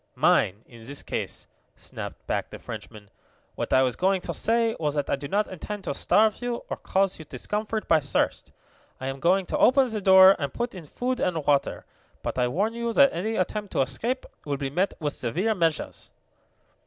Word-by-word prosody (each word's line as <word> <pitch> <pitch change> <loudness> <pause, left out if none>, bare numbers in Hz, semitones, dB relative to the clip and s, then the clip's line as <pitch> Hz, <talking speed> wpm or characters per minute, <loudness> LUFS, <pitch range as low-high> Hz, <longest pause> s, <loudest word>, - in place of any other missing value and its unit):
"Mine, 100 +4 +2
in 120 - -15
this 135 +5 -7
case," - - -5 0.3
snapped - - -9
back - - -2
the - - -8
Frenchman. 105 -2 -9 0.4
"What - - -4
I 130 - +5
was 125 -2 0
going 190 +1 +2
to - - -4
say 230 0 +1
was 150 -2 -1
that 145 -1 -1
I - - +3
do 140 +1 -7
not 205 +7 +1
intend 195 +3 -6
to - - -2
starve 215 +1 +2
you, 245 -1 -3
or - - -2
cause 195 -1 0
you 160 - -9
discomfort 210 - -3
by 160 - +5
thirst. 140 -1 -1 0.5
I 130 - -6
am 135 0 -4
going 185 +5 +3
to - - -2
open 265 +1 +5
the 215 -1 -2
door 190 0 +8
and 140 -3 -2
put 240 - -3
in 175 -5 -10
food 250 - -2
and 165 -5 -1
water. 140 -1 +1 0.4
But - - -3
I 125 - +3
warn 200 - 0
you 235 0 -2
that 280 +2 +5
any 215 +7 -2
attempt 205 +2 -2
to - - +2
escape 230 - -2 0.2
will 145 -1 -2
be 135 -1 -3
met 185 +6 0
with 145 -3 -2
severe 180 - -1
measures. 165 -5 -1
185 Hz, 205 wpm, -26 LUFS, 140-215 Hz, 0.5 s, door